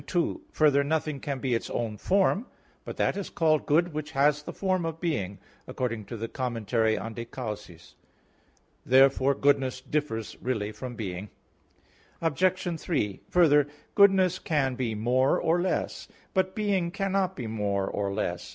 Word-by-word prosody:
2: 175 -2 0
Further, 145 -2 +4
nothing 155 -1 -1
can 140 0 -3
be 130 -1 -1
its 115 - -1
own 115 -3 -2
form. 195 - +1 0.4
"But - - -7
that - - +1
is 200 -1 -4
called 155 -2 +1
good 170 +3 +3
which 150 0 -5
has 145 +1 +3
the - - -7
form 185 -2 0
of 165 -1 -4
being," 105 - -2 0.3
according 115 -4 -3
to 115 - -7
the 115 +2 -4
commentary 115 -3 0
on 115 +3 -5
De 115 - -5
Causis. 105 -8 -8 0.9
Therefore 135 +1 +4
goodness 135 -2 +2
differs 130 -6 -3
really 110 -5 -2
from 125 +2 -7
being. 100 -2 -5 0.9
Obj. 170 +2 0
3: 105 - -2
Further, 150 -5 +5 0.3
goodness 190 -3 +5
can 140 -5 0
be 120 -3 -2
more 125 +5 +2
or 170 +2 +2
less. 185 - -2 0.3
But 190 -1 +1
being 200 -5 +1
cannot 195 0 -1
be 125 - -5
more 100 -3 -1
or 100 0 -2
less. 90 -3 -3
135 Hz, 155 wpm, -27 LUFS, 115-170 Hz, 0.9 s, Further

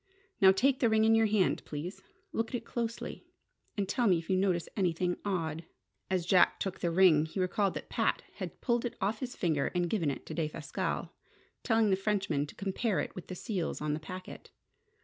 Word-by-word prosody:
Now 190 -1 +9
take 260 +7 +2
the 235 - +3
ring 220 0 +4
in 225 - +5
your 225 0 +5
hand, 205 -3 +2
please. 155 +6 -6 0.3
Look 225 0 -1
at - - -4
it 245 - -4
closely, 235 -1 -4 0.5
and 200 -2 0
tell 240 +4 +1
me 180 -3 +5
if 165 +3 -5
you - - +4
notice 185 -3 +1
anything 180 -2 +1
odd." 165 -5 -2 0.5
As 185 -3 0
Jack 180 0 +4
took 190 -1 -3
the 175 - 0
ring, 165 -3 +5
he 175 - -5
recalled 185 +1 +1
that - - -6
Pat - - 0
had - - -6
pulled 240 -2 +1
it 240 - -3
off 215 +2 0
his 250 -2 -5
finger 155 -6 +1
and 175 -1 +2
given 170 -9 +1
it 140 - -5
to - - -6
Defasquelle, 155 -2 -3 0.5
telling 225 -3 +3
the - - +5
Frenchman 195 -7 0
to - - -12
compare 200 +2 -1
it - - -3
with 185 - -9
the 185 - -6
seals 185 -4 -3
on 150 0 -1
the 150 - -2
packet. 185 +4 -9
190 Hz, 205 wpm, -31 LUFS, 170-220 Hz, 0.5 s, Now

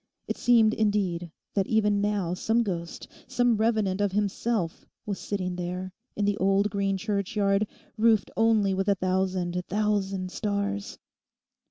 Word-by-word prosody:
It - - -2
seemed, 225 -3 +4
indeed, 195 -5 0 0.2
that 195 -2 +1
even 210 -2 +2
now 205 -4 0
some 225 +6 +1
ghost, 170 -5 -5 0.2
some 245 -3 +2
revenant 215 -3 +1
of 200 -2 +1
himself 205 -2 -1 0.2
was 200 -2 -3
sitting 185 -3 -3
there, 180 +1 -4 0.2
in 205 - 0
the 205 0 +1
old 195 +2 +2
green 195 -1 0
churchyard, 200 0 0 0.3
roofed 220 -3 +3
only 220 -3 +3
with 195 +1 -1
a 200 - +4
thousand 185 -1 0
thousand 195 -2 0
stars. 205 0 -2
200 Hz, 140 wpm, -27 LUFS, 185-210 Hz, 0.3 s, seemed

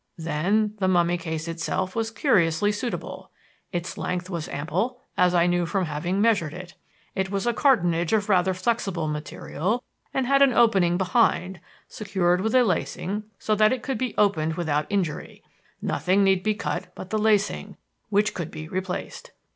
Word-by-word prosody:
Then 185 +7 0
the 190 - +1
mummy 175 -1 +3
case 160 -1 -4
itself 175 +3 -2
was 225 -1 -1
curiously 205 - +2
suitable. 235 +3 -5 0.4
Its 175 -1 -4
length 180 +1 -3
was 170 -3 -4
ample, 190 - -2 0.2
as 180 -2 +3
I 170 -1 +4
knew 175 -1 +1
from 190 0 0
having 170 +5 -2
measured 200 -9 +2
it. 180 -1 -9 0.4
It 190 0 -1
was 195 +2 -2
a 240 - +2
cartonnage 175 - +2
of 210 -2 +2
rather 190 -2 +3
flexible 190 -4 -1
material 155 - -3 0.3
and 265 - 0
had 275 +2 +3
an 275 -2 +6
opening 190 -8 +4
behind, 190 -2 +1 0.3
secured 180 -4 0
with 220 +4 0
a 255 - +6
lacing 210 -2 -2
so 215 - -1
that 215 0 +4
it 255 -2 -2
could 265 -4 -2
be 255 -4 -2
opened 160 -6 +2
without 150 -3 -1
injury. 185 -7 -3 0.4
Nothing 190 +2 +2
need 190 -1 +3
be 215 +2 0
cut - - -3
but 185 - -9
the 215 - +1
lacing, 210 -1 +1 0.3
which 210 0 +2
could 170 -4 -4
be 155 0 -8
replaced. 185 - -5
190 Hz, 170 wpm, -25 LUFS, 170-215 Hz, 0.4 s, an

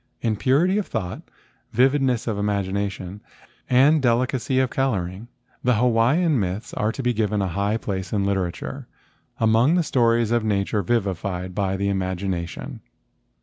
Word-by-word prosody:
In 110 -2 0
purity 160 - +2
of 205 - -4
thought, 95 -5 -4 0.5
vividness 130 -1 +2
of 110 - -1
imagina¬ 100 -1 -1
tion, 95 +1 -9 0.5
and 140 +5 +5
delicacy 130 +1 +1
of 130 -1 +2
coloring 100 -5 -2 0.4
the 125 -1 +3
Hawaiian 125 +7 +3
myths 95 +3 -3
are 105 +1 0
to 135 - -6
be 125 0 +1
given 105 -2 0
a 95 - 0
high 100 +5 0
place 95 -5 -4
in 100 -2 0
literature 95 -3 -3 0.5
among 115 +8 +4
the 175 - +2
stories 115 -5 +2
of 120 -2 +2
nature 105 0 0
vivified 95 -3 -2
by 95 -1 -1
the 100 - -2
im¬ 100 -1 0 0.2
agination. 90 -3 -4
110 Hz, 150 wpm, -23 LUFS, 100-125 Hz, 0.5 s, and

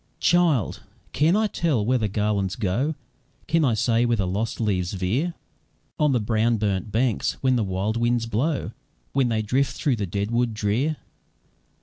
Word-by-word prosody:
"Child! 165 - +2 0.3
can 160 +5 +3
I 220 +1 +3
tell 155 - 0
where 125 +2 +2
the 110 - 0
garlands 100 -2 -1
go? 125 +9 -1 0.5
Can 165 0 +2
I 125 -6 +2
say 115 +2 +2
where 120 -1 +2
the 100 - 0
lost 105 +5 -2
leaves 95 -5 0
veer 115 - -1 0.6
On 150 -1 +3
the 125 - +2
brown 110 +1 +1
burnt 105 0 -1
banks, 115 0 +1
when 130 -1 +3
the 115 - +1
wild 100 +3 -1
winds 120 0 +1
blow, 130 +7 -1 0.4
When 130 -3 +2
they 110 -1 0
drift 130 +4 0
through 135 -5 +1
the 100 -2 -2
dead 100 +4 -2
wood 120 -1 0
drear? 115 +9 0
115 Hz, 170 wpm, -24 LUFS, 105-135 Hz, 0.6 s, can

